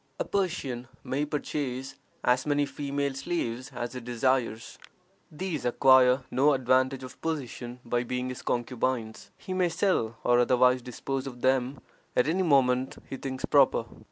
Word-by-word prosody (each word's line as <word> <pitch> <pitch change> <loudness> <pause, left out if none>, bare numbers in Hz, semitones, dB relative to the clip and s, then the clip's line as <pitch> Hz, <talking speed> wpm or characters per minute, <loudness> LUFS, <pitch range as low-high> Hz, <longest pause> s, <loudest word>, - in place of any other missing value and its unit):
A - - 0
Persian 155 -11 -2 0.2
may 140 +3 -1
purchase 140 -3 -3 0.3
as 125 +3 +2
many 145 0 +2
female 140 0 -2
slaves 130 -4 -3
as 120 +1 -5
he 125 - -5
desires. 120 -1 -1 0.5
These 160 -1 -4
acquire 130 +1 +5
no 140 +4 +4
advantage 130 +1 +2
of 130 0 -11
position 125 -6 -4
by 120 +1 0
being 125 +1 -3
his 125 - -6
concubines; 120 -2 -2
he 185 - -6
may 185 -1 +2
sell 140 - 0
or 120 0 +4
otherwise 125 +1 +4
dispose 130 +2 -4
of 125 -2 -8
them 130 +1 +1 0.3
at 125 - +3
any 175 +4 +1
moment 130 -6 +2
he - - -2
thinks 130 0 -4
proper. - - +4
130 Hz, 150 wpm, -28 LUFS, 125-140 Hz, 0.5 s, acquire